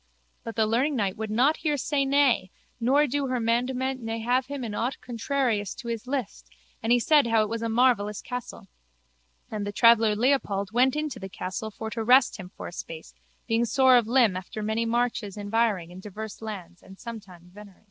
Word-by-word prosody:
But 230 - -6
the 220 - +2
learningknight 230 -3 0
would 220 0 -4
not 255 +8 +3
hear 300 -2 -1
say 280 0 0
nay 270 -9 +3 0.3
nor 270 +5 +3
do 285 0 -1
her 255 -1 -1
mandement 250 +3 0
ne 225 0 -3
have 250 +3 +1
him 280 -2 -5
in 220 -3 -4
aught 240 +5 -2
contrarious 235 -4 -1
to 235 - -7
his 230 +1 -4
list 245 - -4 0.3
and 225 - -1
he 245 - +6
said 290 +1 +4
how 225 -1 +3
it 210 - -4
was 230 0 -3
a 230 - -2
marvellous 225 -3 +2
castle. 250 -4 -7 0.8
And 210 -1 -3
the 205 - -3
traveller 225 0 +5
Leopold 210 -5 +1
went 255 +3 +3
into 300 -2 -3
the 195 - -7
castle 185 +5 -5
for 220 +1 -7
to 225 0 -3
rest 255 +2 +5
him 185 -3 -9
for - - -6
a - - -8
space 165 -2 -8 0.3
being 230 0 +2
sore 260 +2 +5
of 240 -3 +3
limb 235 -5 +4
after 185 +4 -6
many 220 +2 -1
marches 230 -4 -1
environing 205 -4 0
in 180 - -10
divers 210 +2 -8
lands 185 -6 -8
and 190 0 -14
sometime 195 -7 -10
venery. 205 -1 -13
230 Hz, 200 wpm, -26 LUFS, 210-255 Hz, 0.8 s, he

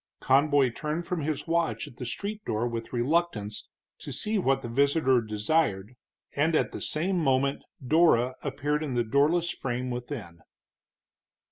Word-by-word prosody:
Conboy 140 -1 +3
turned 155 +7 -3
from 180 -2 -2
his 150 0 -2
watch 165 -10 0
at 125 - -14
the 125 - -5
street 210 - -5
door 110 +3 -1
with 115 -1 -5
reluctance, 120 -5 -1 0.3
to - - -7
see 215 0 -1
what 135 -6 +1
the - - -4
visitor 135 +1 +3
desired, 105 0 0 0.4
and 155 +3 +2
at - - +1
the - - -7
same 180 +4 0
moment 135 -2 +1 0.2
Dora 130 -4 +4
appeared 150 +2 -1
in 135 -5 -3
the 120 - +2
doorless 150 +9 +2
frame 125 0 -3
within. 120 - -6
140 Hz, 150 wpm, -28 LUFS, 120-160 Hz, 0.4 s, Dora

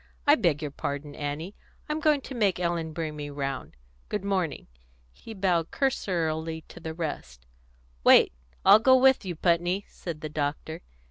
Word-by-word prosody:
"I 290 - +7
beg 165 - +2
your 150 - -3
pardon, 145 +1 -4
Annie. 150 +6 -4 0.3
I'm 300 +1 -2
going 305 -3 +3
to 270 - -8
make 205 -7 +1
Ellen 170 -2 -1
bring 155 -1 -4
me 145 -1 -6
round. 135 - -4 0.3
Good 195 - -3
morning." 185 -6 -1 0.5
He 220 - -11
bowed 180 -4 +1
cursorily 165 - -1
to - - -11
the 160 -1 -6
rest. 65 - -5 0.6
"Wait - - +7 0.3
I'll 215 - +9
go 260 +3 +6
with 265 -4 +4
you, 180 -2 -3
Putney," 175 +4 +1
said 165 -4 -7
the 155 - -4
doctor. 155 +2 -3
165 Hz, 160 wpm, -27 LUFS, 150-195 Hz, 0.6 s, I'll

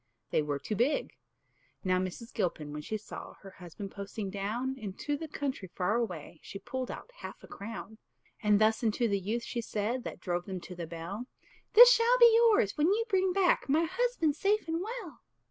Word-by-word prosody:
they - - +3
were 145 -1 -2
too 210 - -4
big. 270 - +1 0.7
Now 185 -1 +2
Mrs. 185 +6 -5
Gilpin, 165 -8 -2
when 150 - -5
she 215 +8 -3
saw 210 - -9
Her 195 - -11
husband 185 +2 -9
posting 200 0 -5
down 225 +7 -2
Into 215 +7 -3
the 320 +2 -5
country 280 -9 -4
far 185 +3 +1
away, 175 -8 -4
She - - -8
pulled 260 +5 -5
out - - -8
half - - -9
a - - -11
crown; 220 +1 -8 0.4
And 210 -2 +4
thus 220 +2 +3
unto 230 +1 +2
the 200 -2 +1
youth, 220 +5 -2
she 235 - -3
said, 225 +3 -2
That - - -6
drove 175 -1 -2
them 190 -2 -4
to 180 - -9
the 170 -1 -5
Bell, 175 +9 -6 0.5
"This - - +11
shall 475 +1 +4
be 475 -2 +8
yours, 450 - +4
when 300 - +4
you 430 +5 +2
bring 380 -2 +2
back 365 -6 +2
My 310 +4 +4
husband 475 - +1
safe 405 +4 +1
and 330 +1 -1
well." 420 - -6
225 Hz, 195 wpm, -31 LUFS, 195-325 Hz, 0.7 s, This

